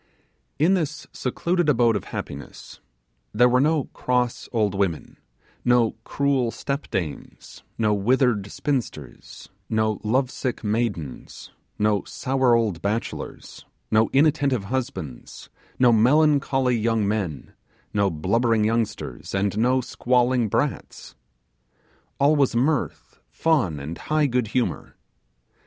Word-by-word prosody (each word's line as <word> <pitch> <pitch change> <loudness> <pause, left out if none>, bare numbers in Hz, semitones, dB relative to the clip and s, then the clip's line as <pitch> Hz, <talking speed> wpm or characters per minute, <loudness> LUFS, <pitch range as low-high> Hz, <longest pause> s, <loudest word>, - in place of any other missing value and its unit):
In 165 +6 +3
this 155 -4 -2
secluded 170 +6 -1
abode 120 -4 +3
of 100 - -3
happiness 70 +1 -8 0.6
there 125 +3 +6
were 125 +1 +3
no 155 0 +2
cross 125 -1 -1
old 110 -5 +1
women, 95 -5 -2 0.5
no 120 -2 +3
cruel 140 -3 0
step 140 +4 -4
dames, 85 -8 -6 0.2
no 110 -2 +2
withered 105 -1 +1
spinsters, 110 - -5 0.2
no 110 -1 0
lovesick 125 +2 -1
maidens, 105 - -3 0.3
no 105 -1 +1
sour 130 -2 +1
old 105 -8 0
bachelors, 105 +4 -4 0.3
no 110 0 +3
inattentive 140 -5 +2
husbands, 100 - -5 0.3
no 125 -1 +5
melancholy 135 +1 +3
young 115 -2 +1
men, 100 -9 -3 0.4
no 100 -1 +2
blubbering 110 +7 +1
youngsters, 110 - -2
and 100 0 0
no 125 +4 +2
squalling 125 -1 +1
brats. - - -3 1.1
All 145 +2 +4
was 140 -5 +2
mirth, 140 +4 -1
fun 125 - +1
and 75 +5 -7
high 155 0 +1
good 125 -4 0
humour. 120 +3 -2
120 Hz, 110 wpm, -24 LUFS, 105-135 Hz, 1.1 s, there